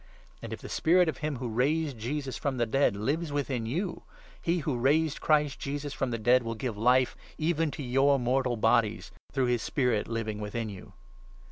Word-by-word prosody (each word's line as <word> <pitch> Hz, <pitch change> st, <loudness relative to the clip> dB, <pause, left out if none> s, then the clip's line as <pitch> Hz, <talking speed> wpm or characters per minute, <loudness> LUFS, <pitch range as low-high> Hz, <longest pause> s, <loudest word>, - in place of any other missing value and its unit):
And, -, -, -7 dB
if -, -, -6 dB
the -, -, -8 dB
Spirit 175 Hz, +2 st, +3 dB
of 155 Hz, -, -2 dB
him 150 Hz, -1 st, -2 dB
who 125 Hz, 0 st, -4 dB
raised 140 Hz, +6 st, 0 dB
Jesus 135 Hz, +3 st, -3 dB
from 140 Hz, -2 st, -2 dB
n -, -, -6 dB
the 120 Hz, -, +2 dB
dead 135 Hz, -1 st, +2 dB
lives 145 Hz, +10 st, -1 dB
within 135 Hz, -5 st, -2 dB
you, 175 Hz, -, -2 dB, 0.4 s
he 170 Hz, +1 st, +1 dB
who 145 Hz, -, 0 dB
raised 150 Hz, +4 st, +2 dB
Christ 150 Hz, -3 st, +2 dB
Jesus 145 Hz, +1 st, -4 dB
from 135 Hz, 0 st, -1 dB
the 115 Hz, -, -2 dB
dead 120 Hz, +3 st, +4 dB
will 115 Hz, -1 st, -4 dB
give 120 Hz, -1 st, -3 dB
Life 125 Hz, +4 st, +3 dB, 0.2 s
even 160 Hz, 0 st, +1 dB
to 145 Hz, -, -6 dB
your 135 Hz, +3 st, +3 dB
mortal 125 Hz, -1 st, 0 dB
bodies, 110 Hz, -1 st, +2 dB, 0.2 s
through 135 Hz, -2 st, +1 dB
his 120 Hz, -2 st, +1 dB
Spirit 125 Hz, -6 st, 0 dB
living 110 Hz, -2 st, -3 dB
within 110 Hz, +2 st, -3 dB
you. 95 Hz, -3 st, -10 dB
130 Hz, 200 wpm, -29 LUFS, 115-145 Hz, 0.4 s, dead